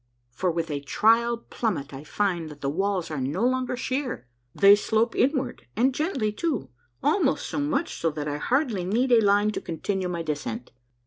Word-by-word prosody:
for 180 +10 -1
with 165 -1 -2
a 145 - -1
trial 230 - +3
plummet 185 - -3
I 135 +2 -7
find 175 -2 -1
that 150 -1 -12
the 140 - -1
walls 190 0 -1
are 145 -3 -3
no 150 - 0
longer 255 0 0
sheer; 255 - -3 0.3
they 200 0 +8
slope 220 +2 0
inward, 265 -2 0
and 255 +5 +3
gently 270 - -1
too, 215 - -2 0.3
almost 315 +7 +2
so - - -3
much 295 +3 0
so 165 - +1
that 150 -1 -4
I 145 0 -2
hardly 240 - 0
need 235 +8 +1
a 235 -2 +7
line 205 +1 +3
to - - -4
continue 185 +2 -3
my 170 -1 -3
descent. 155 +9 -4
205 Hz, 185 wpm, -26 LUFS, 160-250 Hz, 0.3 s, they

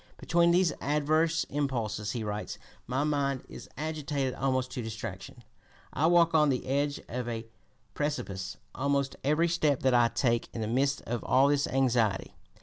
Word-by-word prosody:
"Between 170 0 +3
these 175 -2 +3
adverse 155 +3 +2
impulses," 115 -8 -2
he 115 - -3
writes, 105 0 -4 0.3
"my 130 +4 0
mind 140 -3 0
is - - -10
agitated 145 -3 -2
almost 130 -1 -1
to 125 - -4
distraction.... 110 0 -7 0.5
I 160 - +2
walk 170 -1 +4
on 150 -2 +5
the 130 -2 -1
edge 140 +2 0
of 125 0 -4
a 115 -1 -4 0.5
precipice 100 -11 -3 0.2
almost 140 0 0
every 150 +4 +3
step 155 -5 +1
that 130 -1 +3
I 120 -1 +5
take." 115 0 0
In 115 - -3
the 110 - -1
midst 135 +4 +1
of 120 0 -3
all 135 +2 +4
this 145 -1 +2
anxiety, 120 -6 +1 0.2
(p. - - -25
135 Hz, 165 wpm, -29 LUFS, 120-150 Hz, 0.5 s, on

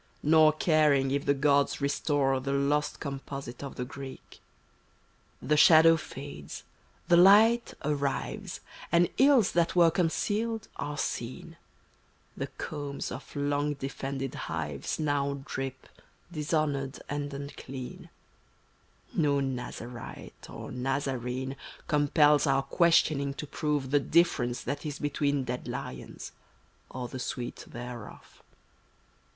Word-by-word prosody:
Nor 155 0 +6
caring 150 -4 +3
if 140 0 -1
th^ 140 -1 +2
gods 140 0 +3
restore 140 -1 +1
The 140 +1 -2
lost 145 +2 0
composite 135 -2 -6
of 140 - -7
the 125 - -3
Greek. 135 0 -10 1.0
il26] - - -7
The 150 - +4
shadow 165 +1 +8
fades, 140 - -8 0.4
the 170 -1 +6
light 215 +6 +6
arrives, 140 -2 -2 0.3
And 170 +1 +4
ills 265 -7 +5
that 170 0 +1
were 170 -2 +6
concealed 210 +6 -1
are 145 +1 -4
seen; 120 -3 -4 0.8
The - - -3
combs 145 -2 -5
of - - -9
long 145 +1 0
defended 135 -1 -4
hives 75 -4 -4
Now 140 -2 -1
drip 135 -1 -5 0.4
dishonored 150 -4 -1
and 145 0 -3
unclean; 140 -2 -8 1.0
No 145 -4 +2
Nazarite 125 -3 -6
or - - -8
Nazarene 130 0 -2 0.3
Compels 150 0 +4
our 135 0 +3
questioning 140 -2 +3
to 150 - -5
prove 145 -2 -2
The 145 - +5
difference 140 -6 +2
that 140 +2 -3
is 150 -3 -4
between 145 -1 0
Dead 125 0 -4
lions - - -6 0.3
— - - -36
or 125 -1 -5
the 130 - -7
sweet 125 -1 -5
thereof. 120 -2 -9
140 Hz, 120 wpm, -29 LUFS, 135-155 Hz, 1.0 s, shadow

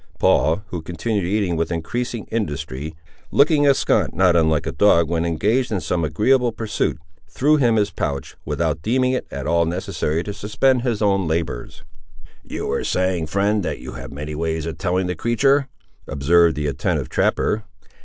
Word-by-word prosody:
Paul, 80 +8 +2
who 85 - -4
continued 90 +5 -2
eating 95 -2 0
with 80 +1 -1
increasing 115 +7 -3
industry, 75 - -3 0.3
looking 145 0 +4
askaunt 140 - +2
not 90 -1 +4
unlike 80 -2 +2
a - - -2
dog 85 -5 +4
when 85 0 0
engaged 105 +10 +1
in 105 - -1
the - - -4
same 85 -2 -1
agreeable 120 - +2
pursuit, 110 -6 -2 0.3
threw 150 +3 +2
him 120 -5 +3
his 105 -2 +1
pouch, 70 -7 -4
without 80 -2 -1
deeming 130 +6 +1
it 130 - -2
at 70 -1 -6
all 85 +2 +2
necessary 85 -2 -2
to 100 - -5
suspend 115 +6 +1
his 120 -4 -1
own 95 -3 +2
labours. 80 -6 -3 0.6
"You - - -5
were 70 - -1
saying, 90 -3 0
friend, 100 +5 +1
that - - -3
you - - -9
have 60 +3 -8
many 75 +2 -6
ways 80 0 -2
of 80 -1 -6
telling 95 -1 0
the 90 - -1
creatur'?"—observed 85 - +1
the 75 - -3
attentive 70 -3 -1
trapper. 110 +1 +1
90 Hz, 170 wpm, -21 LUFS, 80-110 Hz, 0.6 s, looking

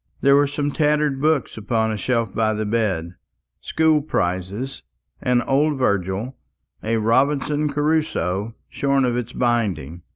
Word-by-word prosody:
There 140 0 +5
were 145 0 +4
some 145 0 -2
tattered 150 -2 +1
books 155 -6 +1
upon 110 +1 0
a - - -2
shelf 115 +1 -1
by 110 0 +1
the 110 0 -2
bed 95 -6 -1 0.4
school 160 -1 +2
prizes, 100 - -3 0.4
an 125 -1 +2
old 145 +2 +1
Virgil, 100 +1 -1 0.4
a 115 +1 0
"Robinson 140 +6 +1
Crusoe" 140 - -1
shorn 140 -1 +1
of 120 -1 0
its 120 -1 -3
binding. 105 - -1
125 Hz, 135 wpm, -22 LUFS, 105-145 Hz, 0.4 s, There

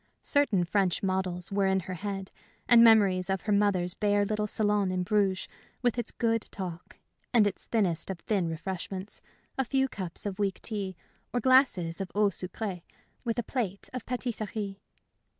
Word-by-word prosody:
Certain 280 - +3
French 185 0 +1
models 185 -1 -1
were 195 -1 +2
in 190 0 +2
her 185 +1 -6
head, 195 +1 -5 0.4
and 235 -1 +8
memories 200 -5 +5
of 190 -1 0
her 215 - -2
mother's 200 -4 +2
bare 205 -1 +2
little 210 0 -1
salon 205 -2 +1
in 185 -1 0
Bruges, 195 -1 +1 0.4
with 245 0 +2
its 235 - -2
good 230 -2 0
talk, 180 -3 -7 0.4
and 220 -3 +6
its 200 -1 -3
thinnest 185 -8 0
of 190 - -3
thin 190 -5 0
refreshments 185 +3 -5 0.4
a - - +4
few 265 +2 +1
cups 190 -8 -6
of 200 -1 -4
weak 195 -2 0
tea, 200 -4 -3 0.4
or 245 - 0
glasses 240 -10 +3
of 190 - -5
eau 210 0 +4
sucrée, 185 0 -4 0.4
with 230 -2 -1
a 240 - 0
plate 210 -6 -3
of 255 -3 -4
patisserie. 215 -5 -3
200 Hz, 170 wpm, -29 LUFS, 185-220 Hz, 0.4 s, and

